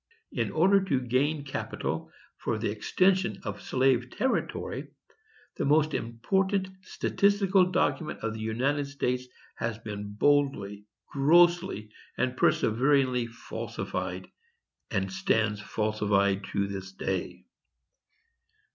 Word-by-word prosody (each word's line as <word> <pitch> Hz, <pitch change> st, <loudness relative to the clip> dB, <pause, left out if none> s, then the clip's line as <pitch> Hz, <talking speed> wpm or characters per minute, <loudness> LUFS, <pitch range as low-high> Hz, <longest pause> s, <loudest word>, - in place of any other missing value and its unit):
_In -, -, 0 dB
order 190 Hz, +4 st, +4 dB
to 140 Hz, -8 st, +1 dB
gain 135 Hz, +5 st, 0 dB
capital 135 Hz, -, -4 dB, 0.3 s
for 110 Hz, -, -2 dB
the 110 Hz, -1 st, -1 dB
extension 185 Hz, -, +1 dB
of 105 Hz, -3 st, -5 dB
slave 130 Hz, -2 st, +2 dB
territory, 260 Hz, -, -2 dB, 0.7 s
the -, -, -1 dB
most 150 Hz, +1 st, +3 dB
important 190 Hz, -, 0 dB
statistical 195 Hz, 0 st, +2 dB
document 175 Hz, -3 st, 0 dB
of 115 Hz, -1 st, -2 dB
the 110 Hz, -, -7 dB
United 130 Hz, +6 st, 0 dB
States 125 Hz, -3 st, -2 dB, 0.3 s
has 115 Hz, -1 st, -2 dB
been 105 Hz, -2 st, -6 dB
boldly, 105 Hz, -7 st, +1 dB, 0.3 s
grossly, 170 Hz, -, +3 dB, 0.3 s
and 130 Hz, 0 st, 0 dB
perseveringly 125 Hz, +1 st, +2 dB
falsified, 115 Hz, 0 st, -5 dB, 0.6 s
and 95 Hz, -2 st, -1 dB
stands 105 Hz, +2 st, +1 dB
falsified 100 Hz, -3 st, 0 dB
to 100 Hz, +1 st, -1 dB
this 95 Hz, -1 st, -6 dB
day. -, -, -4 dB
125 Hz, 105 wpm, -28 LUFS, 105-155 Hz, 0.7 s, order